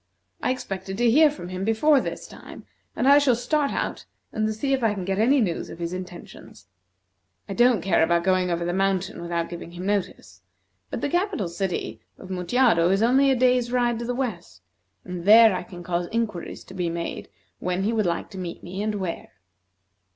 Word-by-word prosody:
I -, -, 0 dB
expected 195 Hz, -6 st, -4 dB
to 240 Hz, 0 st, +3 dB
hear 305 Hz, +5 st, +6 dB
from 280 Hz, -12 st, -8 dB
him 185 Hz, +1 st, -4 dB
before 260 Hz, +7 st, +3 dB
this -, -, -6 dB
time, -, -, -12 dB, 0.3 s
and 255 Hz, -, 0 dB
I 285 Hz, +1 st, +8 dB
shall 275 Hz, -4 st, +3 dB
start 280 Hz, +4 st, 0 dB
out -, -, -3 dB, 0.3 s
and 215 Hz, -1 st, 0 dB
see 270 Hz, +6 st, -1 dB
if 265 Hz, -, 0 dB
I 215 Hz, -2 st, +2 dB
can 190 Hz, -2 st, -5 dB
get 195 Hz, +1 st, -1 dB
any 265 Hz, +6 st, +4 dB
news 185 Hz, -8 st, -1 dB
of -, -, -9 dB
his 170 Hz, +1 st, -4 dB
intentions. 180 Hz, -, -10 dB, 0.8 s
I -, -, -4 dB
don't 240 Hz, -4 st, +3 dB
care 190 Hz, -4 st, +2 dB
about 170 Hz, +1 st, +2 dB
going 185 Hz, 0 st, +2 dB
over 170 Hz, 0 st, -1 dB
the 175 Hz, -, -1 dB
mountain 195 Hz, -1 st, -1 dB
without 170 Hz, -1 st, -2 dB
giving 170 Hz, 0 st, -9 dB
him 180 Hz, +1 st, -7 dB
notice, 200 Hz, -1 st, -3 dB, 0.5 s
but -, -, -5 dB
the -, -, 0 dB
capital 355 Hz, -, -1 dB
city 175 Hz, +2 st, -4 dB, 0.2 s
of 190 Hz, -, -11 dB
Mutjado 180 Hz, -1 st, +2 dB
is 195 Hz, +3 st, +2 dB
only 265 Hz, +4 st, +4 dB
a 265 Hz, -, +3 dB
day's 250 Hz, -1 st, +2 dB
ride 240 Hz, -2 st, +1 dB
to 235 Hz, -, -4 dB
the 245 Hz, +1 st, -2 dB
west, 195 Hz, -, -5 dB, 0.4 s
and 180 Hz, -2 st, -6 dB
there 220 Hz, +1 st, +7 dB
I -, -, -3 dB
can 175 Hz, 0 st, -10 dB
cause 175 Hz, 0 st, -2 dB
inquiries 225 Hz, -6 st, -3 dB
to -, -, -13 dB
be 180 Hz, -2 st, -2 dB
made 170 Hz, 0 st, -5 dB, 0.3 s
when 180 Hz, +1 st, -2 dB
he 220 Hz, +3 st, 0 dB
would 215 Hz, -4 st, +1 dB
like 170 Hz, +5 st, -3 dB
to 190 Hz, -, -8 dB
meet 175 Hz, -2 st, -6 dB
me, 185 Hz, +3 st, -5 dB
and 215 Hz, 0 st, -1 dB
where." 185 Hz, -4 st, -5 dB
195 Hz, 205 wpm, -24 LUFS, 175-240 Hz, 0.8 s, I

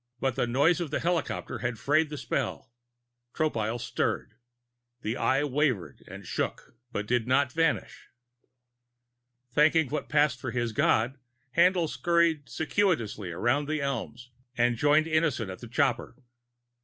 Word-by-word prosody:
But 135 Hz, -3 st, 0 dB
the 125 Hz, -2 st, 0 dB
noise 145 Hz, +9 st, +3 dB
of 165 Hz, -, -3 dB
the 150 Hz, -, -1 dB
helicopter 170 Hz, -3 st, -2 dB
had 120 Hz, -2 st, -2 dB
frayed 155 Hz, +4 st, +2 dB
the 150 Hz, -, -6 dB
spell. 120 Hz, -, -3 dB, 0.6 s
Tropile 115 Hz, -7 st, -1 dB
stirred. -, -, -2 dB, 0.7 s
The 110 Hz, +2 st, -1 dB
Eye 135 Hz, +2 st, +1 dB
wavered 140 Hz, -, -1 dB
and -, -, -10 dB
shook -, -, -3 dB, 0.2 s
But 105 Hz, -, -3 dB
did 120 Hz, +1 st, 0 dB
not 130 Hz, +1 st, +2 dB
vanish. 165 Hz, +2 st, -1 dB, 1.4 s
Thanking 150 Hz, +1 st, +4 dB
what 150 Hz, -, -3 dB
passed 150 Hz, -4 st, +2 dB
for -, -, -4 dB
his 120 Hz, -2 st, -1 dB
God, 120 Hz, +4 st, +1 dB, 0.4 s
Haendl 175 Hz, 0 st, +4 dB
scuttled 160 Hz, +2 st, +1 dB
circuitously 155 Hz, -, 0 dB
around 120 Hz, -, 0 dB
the 155 Hz, 0 st, -1 dB
elms 125 Hz, -3 st, -4 dB, 0.3 s
and 120 Hz, 0 st, +3 dB
joined 145 Hz, +5 st, +3 dB
Innison 155 Hz, -, 0 dB
at 95 Hz, -, -9 dB
the 120 Hz, -, -9 dB
copter. 125 Hz, -2 st, 0 dB
140 Hz, 140 wpm, -28 LUFS, 120-155 Hz, 1.4 s, Thanking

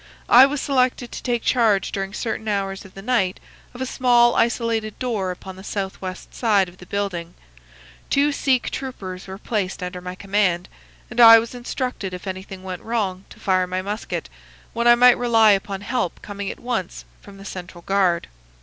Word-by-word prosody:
I 255 Hz, +3 st, +9 dB
was 290 Hz, +1 st, -3 dB
selected 255 Hz, -3 st, 0 dB
to -, -, -6 dB
take 240 Hz, -2 st, -1 dB
charge 220 Hz, -5 st, +2 dB
during 195 Hz, -1 st, -3 dB
certain 220 Hz, 0 st, -4 dB
hours 195 Hz, -1 st, -2 dB
of 195 Hz, -, -15 dB
the 195 Hz, -, -9 dB
night 200 Hz, -6 st, +1 dB, 0.3 s
of 250 Hz, -, -10 dB
a -, -, 0 dB
small 240 Hz, -2 st, +4 dB
isolated 230 Hz, -2 st, 0 dB
door 220 Hz, -7 st, -2 dB
upon 185 Hz, +1 st, -8 dB
the 190 Hz, -, -11 dB
southwest 190 Hz, -2 st, -5 dB
side 205 Hz, -5 st, +2 dB
of 175 Hz, +1 st, -15 dB
the 180 Hz, -, -13 dB
building. 180 Hz, -4 st, -3 dB, 0.7 s
Two 285 Hz, +2 st, +3 dB
Sikh 265 Hz, -3 st, +1 dB
troopers 190 Hz, -9 st, -6 dB
were 190 Hz, 0 st, -7 dB
placed 200 Hz, -3 st, -3 dB
under 180 Hz, 0 st, -5 dB
my 180 Hz, 0 st, -6 dB
command, 195 Hz, -2 st, 0 dB, 0.4 s
and 240 Hz, -, -4 dB
I 230 Hz, -1 st, +11 dB
was 225 Hz, +2 st, -2 dB
instructed 245 Hz, -5 st, -4 dB
if 180 Hz, -, -10 dB
anything 190 Hz, 0 st, -7 dB
went 185 Hz, -1 st, -6 dB
wrong 200 Hz, -5 st, -2 dB
to -, -, -15 dB
fire 185 Hz, -1 st, +1 dB
my 185 Hz, +1 st, -3 dB
musket, 205 Hz, -, -4 dB, 0.5 s
when 235 Hz, +1 st, 0 dB
I 240 Hz, -, +8 dB
might 245 Hz, 0 st, +6 dB
rely 225 Hz, -3 st, +5 dB
upon 195 Hz, 0 st, -1 dB
help 205 Hz, -4 st, -2 dB
coming 205 Hz, -1 st, -5 dB
at -, -, -7 dB
once 235 Hz, -7 st, -4 dB, 0.2 s
from 200 Hz, -1 st, -14 dB
the 195 Hz, -, -12 dB
central 180 Hz, -2 st, -8 dB
guard. 185 Hz, -3 st, +1 dB
200 Hz, 185 wpm, -22 LUFS, 185-240 Hz, 0.7 s, I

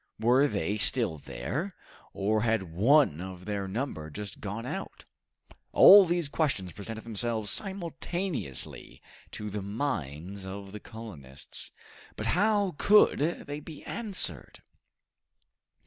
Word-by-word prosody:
Were 125 Hz, +6 st, +4 dB
they 105 Hz, -, -1 dB
still 100 Hz, -, +2 dB
there, 140 Hz, -, -4 dB, 0.4 s
or 105 Hz, +2 st, +1 dB
had 115 Hz, -3 st, +1 dB
one 110 Hz, -, +4 dB
of 90 Hz, -1 st, -8 dB
their 100 Hz, -2 st, -2 dB
number 95 Hz, -, -4 dB
just 100 Hz, +5 st, -7 dB
gone 105 Hz, +3 st, -4 dB
out? -, -, -6 dB, 0.7 s
All 200 Hz, 0 st, +10 dB
these 175 Hz, -2 st, +1 dB
questions 140 Hz, -, -1 dB
presented 110 Hz, +3 st, -7 dB
themselves 110 Hz, -1 st, -1 dB
simultaneously 175 Hz, -, -3 dB, 0.3 s
to 105 Hz, -1 st, -6 dB
the 105 Hz, 0 st, -3 dB
minds 100 Hz, -, -4 dB
of 95 Hz, +1 st, -7 dB
the 105 Hz, -, -7 dB
colonists, 90 Hz, -, -8 dB, 0.4 s
but -, -, -5 dB
how 205 Hz, 0 st, +2 dB
could 210 Hz, +1 st, +6 dB
they 145 Hz, -1 st, -2 dB
be 150 Hz, 0 st, -10 dB
answered? 215 Hz, -5 st, -4 dB
110 Hz, 115 wpm, -29 LUFS, 95-150 Hz, 0.7 s, All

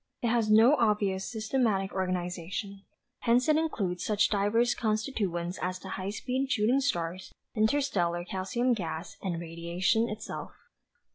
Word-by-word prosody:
"It 235 Hz, -, +2 dB
has 230 Hz, -2 st, +2 dB
no 225 Hz, +5 st, +7 dB
obvious 205 Hz, -4 st, +1 dB
systematic 220 Hz, -4 st, 0 dB
organization. 185 Hz, +1 st, -3 dB, 0.4 s
Hence 245 Hz, +1 st, +3 dB
it 310 Hz, -, +5 dB
includes 200 Hz, -, -1 dB
such 210 Hz, -1 st, +2 dB
diverse 220 Hz, +4 st, +2 dB
constituents 210 Hz, -6 st, -2 dB
as 185 Hz, 0 st, -2 dB
the 190 Hz, -, -10 dB
high 190 Hz, +1 st, -4 dB
speed 260 Hz, +5 st, -2 dB
shooting 240 Hz, +3 st, +3 dB
stars, 180 Hz, -8 st, -2 dB, 0.2 s
interstellar 215 Hz, -8 st, +1 dB
calcium 195 Hz, +8 st, 0 dB
gas 165 Hz, -6 st, -4 dB
and 175 Hz, -4 st, -2 dB
radiation 170 Hz, +7 st, 0 dB
itself. 215 Hz, +1 st, -6 dB
205 Hz, 130 wpm, -29 LUFS, 185-235 Hz, 0.4 s, no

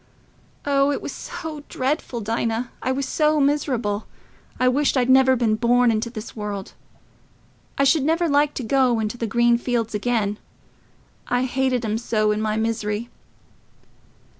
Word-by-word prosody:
Oh, 280 Hz, 0 st, +3 dB
it -, -, -1 dB
was -, -, -6 dB
so 310 Hz, -3 st, -7 dB
dreadful, 260 Hz, -3 st, -2 dB
Dinah... 230 Hz, +2 st, -2 dB
I 260 Hz, -, -1 dB
was 270 Hz, 0 st, -2 dB
so 305 Hz, 0 st, +2 dB
miserable... 255 Hz, -7 st, 0 dB, 0.5 s
I 255 Hz, -, +3 dB
wished 275 Hz, +2 st, +2 dB
I'd 255 Hz, 0 st, +3 dB
never 260 Hz, 0 st, +6 dB
been 230 Hz, -3 st, +1 dB
born 240 Hz, +2 st, +3 dB
into 225 Hz, +1 st, -1 dB
this 225 Hz, -1 st, -8 dB
world. 205 Hz, -3 st, -5 dB, 1.0 s
I 275 Hz, -, +3 dB
should 275 Hz, +3 st, +4 dB
never 325 Hz, +4 st, +1 dB
like 290 Hz, 0 st, +2 dB
to 260 Hz, -, -3 dB
go 250 Hz, -1 st, +2 dB
into 220 Hz, +2 st, -3 dB
the 230 Hz, -, -1 dB
green 235 Hz, +2 st, +3 dB
fields 235 Hz, -3 st, -1 dB
again—I 220 Hz, +2 st, -4 dB
hated 260 Hz, -1 st, 0 dB
'em 215 Hz, +1 st, -1 dB
so 215 Hz, -2 st, +1 dB
in 210 Hz, +1 st, -1 dB
my 215 Hz, 0 st, -1 dB
misery." 220 Hz, 0 st, -2 dB
245 Hz, 150 wpm, -22 LUFS, 220-270 Hz, 1.0 s, never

